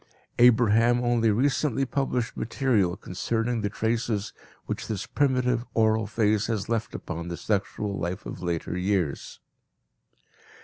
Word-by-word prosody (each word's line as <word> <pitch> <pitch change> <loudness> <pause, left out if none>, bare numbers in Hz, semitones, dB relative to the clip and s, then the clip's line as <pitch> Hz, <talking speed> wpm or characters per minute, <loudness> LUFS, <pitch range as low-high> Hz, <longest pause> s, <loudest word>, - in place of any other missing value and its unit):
Abraham 120 0 +5
only 120 -2 +2
recently 135 +3 +1
published 125 -4 -1
material 110 -8 +1
concerning 115 +5 -2
the 105 - -1
traces 110 -1 -1 0.3
which - - -4
this 105 0 -3
primitive 125 -3 +1
oral 110 -1 +3
phase 105 -1 +1
has 110 -4 -2
left 115 -1 -2
upon 85 0 -5
the 85 -1 -4
sexual 100 +1 -2
life 90 +4 -4
of - - -7
later 85 -1 -2
years. 90 -5 -1
110 Hz, 125 wpm, -26 LUFS, 100-120 Hz, 0.3 s, Abraham